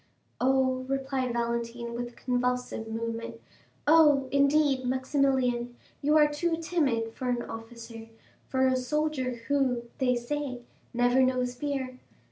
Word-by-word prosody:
"Oh," 260 0 +2
replied 270 -2 -1
Valentine 235 0 -2
with 240 0 -4
a - - -20
convulsive 250 -2 -1
movement, 230 +1 -4 0.5
"oh, 295 -3 +5
indeed, 280 -1 +3
Maximilian, 260 -2 +1 0.3
you 300 +2 +4
are 300 -1 +6
too 325 +3 -1
timid 275 -10 0
for 255 +1 -3
an 240 -1 0
officer, 225 0 -9 0.4
for 265 0 +1
a 260 0 +3
soldier 260 -1 -1
who, 265 -4 +1 0.2
they 250 -2 +2
say, 255 +1 -3 0.3
never 245 +1 +3
knows 255 -1 +1
fear. 260 -1 -4
255 Hz, 125 wpm, -28 LUFS, 240-275 Hz, 0.5 s, are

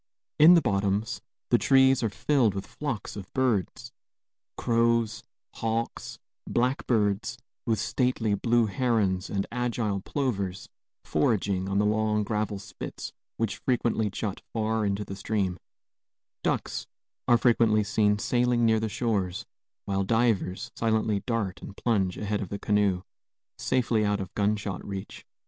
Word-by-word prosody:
In 165 +4 +9
the 170 - +4
bottoms 100 0 0 0.3
the - - +5
trees 135 -1 +5
are 115 - +1
filled 120 -2 +2
with 95 - -4
flocks 130 -9 -5
of 100 -2 -8
birds, 120 -1 0 0.7
crows, 115 -1 +1 0.3
hawks, 115 +1 -3 0.3
blackbirds, 115 -4 +1 0.3
with 110 -1 +2
stately 115 0 0
blue 115 +3 +2
herons 105 -4 0
and 100 -1 -1
agile 115 -5 -1
plovers 100 -8 -2 0.4
foraging 95 +3 +1
on 100 - 0
the 105 - +3
long 105 0 +1
gravel 105 0 -1
spits 100 0 -8 0.2
which 115 -3 -1
frequently 115 -4 0
jut 100 0 -4
far 110 -1 0
into 100 +1 -1
the 95 - -6
stream; 95 -3 -1 0.8
ducks - - -1 0.4
are 120 - +6
frequently 115 -3 +3
seen 105 -1 +2
sailing 120 +1 +2
near 110 -1 +4
the 110 0 -2
shores; 105 -5 -1 0.4
while 100 -1 0
divers 115 0 0
silently 110 -2 +1
dart 110 -6 -1
and 100 - -9
plunge 95 -6 0
ahead 105 0 -2
of 95 - -5
the 100 - -3
canoe, 100 -3 +1 0.6
safely 120 -4 +1
out 105 0 +1
of 95 -2 -6
gunshot 105 -2 -1
reach. 100 0 -7
110 Hz, 135 wpm, -27 LUFS, 100-115 Hz, 0.8 s, In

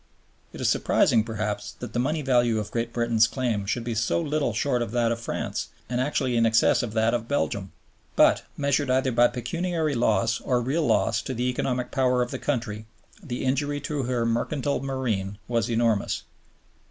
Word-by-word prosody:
It - - -10
is - - 0
surprising, 115 -2 +3
perhaps, 105 -2 -3
that 125 - -8
the 120 - 0
money 150 +5 0
value 120 -4 +3
of 105 -1 -4
Great 115 0 -2
Britain's 115 -1 +3
claim 115 -7 -2
should 115 +3 -1
be 120 0 -3
so 115 +8 +1
little 150 -5 0
short 125 +3 0
of 120 - -2
that 120 -1 +2
of 115 - -2
France 115 - -3 0.2
and 125 +1 -1
actually 130 -2 0
in 115 - +3
excess 115 0 +4
of 115 -3 -4
that 110 0 +2
of 115 -1 -2
Belgium. 100 -9 -1 0.4
But, - - +5 0.2
measured 140 -1 +1
either 130 0 +2
by 120 0 +5
pecuniary 160 +6 -2
loss 115 -1 +1
or 125 -2 +1
real 145 +6 0
loss - - +2
to 130 - -5
the 125 +2 -1
economic 125 0 -2
power 125 -2 +2
of 120 - -6
the - - -4
country, 110 -6 -3 0.3
the 135 -8 -4
injury 145 +2 0
to 145 0 -2
her 125 -2 -1
mercantile 130 +5 0
marine 115 -8 -2
was 115 -1 0
enormous. 115 -3 +1
120 Hz, 190 wpm, -25 LUFS, 115-135 Hz, 0.4 s, But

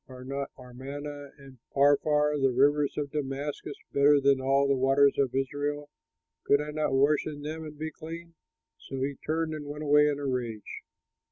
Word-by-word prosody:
Are 130 -1 -11
not 140 +1 -4
Amana 140 +3 -8
and 135 -3 -15 0.2
Pharpar, 150 +1 +3
the 135 - +4
rivers 145 +3 +2
of 145 -2 -3
Damascus, 145 0 -4 0.2
better 145 +1 +5
than 140 -1 +3
all 135 +1 +2
the 140 - +3
waters 135 +2 +3
of 130 -2 +1
Israel? 145 +2 -2 0.5
Could 140 - +4
I 150 0 -4
not 150 -2 -1
wash 140 +3 +3
in 145 -2 -7
them 160 +2 -5
and 150 -1 -9
be 155 +1 -4
clean?" 165 +2 -9 0.5
So 135 -1 -5
he 140 +1 -1
turned 160 0 -1
and 150 -2 -6
went 150 +1 -6
away 150 0 +5
in 145 -1 0
a 145 - -5
rage. 120 -5 -4
145 Hz, 180 wpm, -28 LUFS, 135-150 Hz, 0.5 s, better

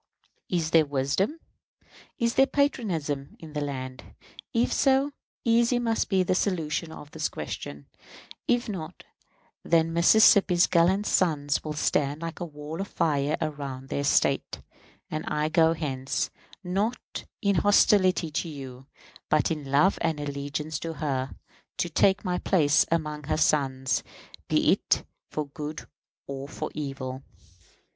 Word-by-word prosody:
Is 165 -3 0
there 160 -2 +5
wisdom, 145 - 0 0.8
is 235 0 +1
there 270 - +5
patriotism 170 - -1
in 160 -2 -11
the 150 - -2
land? 130 -2 -5 0.5
If 235 +1 +1
so, 275 +1 +3 0.3
easy 235 +1 +3
must 230 -2 0
be 190 -2 +3
the 185 - +1
solution 170 -4 -1
of 150 -2 -11
this - - -2
question. 70 0 -6 0.6
If 245 0 +2
not, 180 -7 -6 0.6
then 165 0 +2
Mississippi's 180 0 +6
gallant 185 +4 +3
sons 145 -8 +1
will 155 - -4
stand 150 0 0
like 165 0 -5
a 175 - -3
wall 150 +2 -7
of 195 - -4
fire 150 -4 0
around 140 -4 -5
their 140 - -1
State; 140 - +1 0.5
and 155 0 -2
I 150 0 0
go 165 0 +4
hence, 135 -5 -2 0.3
not 200 +6 -3
in 200 -4 +1
hostility 185 -3 +4
to 165 +3 -2
you, 135 -3 -9 0.4
but 155 +2 +2
in 150 -4 -4
love 150 +8 +3
and 160 -2 0
allegiance 145 +2 -4
to 165 -1 -4
her, 135 -4 -2 0.5
to 175 - -1
take 190 +5 +3
my 180 -1 0
place 150 -5 +3
among 150 -3 -1
her 155 - 0
sons, 135 -4 +1 0.5
be - - +3
it - - +1 0.3
for 150 - -3
good 150 +2 -6 0.4
or 140 0 -6
for - - -5
evil. 135 -3 -5
155 Hz, 140 wpm, -27 LUFS, 145-185 Hz, 0.8 s, Mississippi's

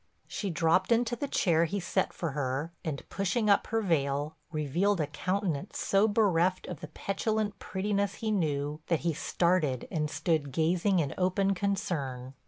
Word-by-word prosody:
She 200 - -4
dropped 165 +4 +2
into 235 0 +3
the 285 +5 -3
chair 170 -10 +3
he 200 +5 -2
set 180 - 0
for 165 -4 -3
her, 140 +3 -2
and, 150 -4 -4
pushing 205 +2 +1
up 200 - +3
her 225 0 0
veil, 145 -3 0 0.2
revealed 170 +6 +1
a 155 - +2
countenance 180 +2 -2
so 200 +2 +3
bereft 185 -4 +2
of 175 -6 -6
the - - -7
petulant 205 +5 -2
prettiness 200 +1 -1
he 220 -1 -2
knew, 150 -5 -1
that 165 - +1
he 170 -1 0
started 160 -5 +1
and 150 -2 -1
stood 155 -1 0
gazing 175 +6 +2
in 145 -5 0
open 190 +2 +2
concern. 145 -10 -2
175 Hz, 165 wpm, -30 LUFS, 150-200 Hz, 0.2 s, into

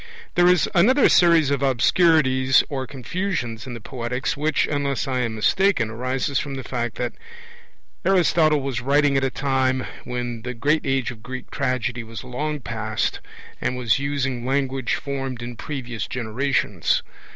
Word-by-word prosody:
There 175 0 +4
is 180 -1 +4
another 245 +10 +5
series 165 -5 +5
of 140 -1 0
obscurities 130 -1 +4
or 135 -2 -3
confusions 135 - -3
in 125 - -6
the - - -7
Poetics 125 +4 -3
which, 150 +1 +1
unless 140 -2 -1
I 130 -1 -1
am 115 -3 -1
mistaken, 125 - +2
arises 130 +4 -1
from 140 -2 -4
the 130 - -5
fact 120 -4 -3
that 120 -1 -3 0.9
Aristotle 165 -5 +3
was 135 -3 -3
writing 140 +2 +3
at 135 - +2
a 135 - +2
time 130 -1 0 0.2
when 120 -2 -4
the 125 +1 -5
great 150 +5 +1
age 135 -2 0
of 110 -3 -12
Greek 130 +2 -8
tragedy 125 -3 -1
was 115 +1 -8
long 145 +4 -3
past, 110 -2 -2 0.4
and 125 - -1
was 120 -3 +2
using 135 -3 -2
language 135 -1 0
formed 135 -3 -4
in 120 0 -6
previous 120 -4 -5
generations. 120 - 0
130 Hz, 155 wpm, -23 LUFS, 120-145 Hz, 0.9 s, another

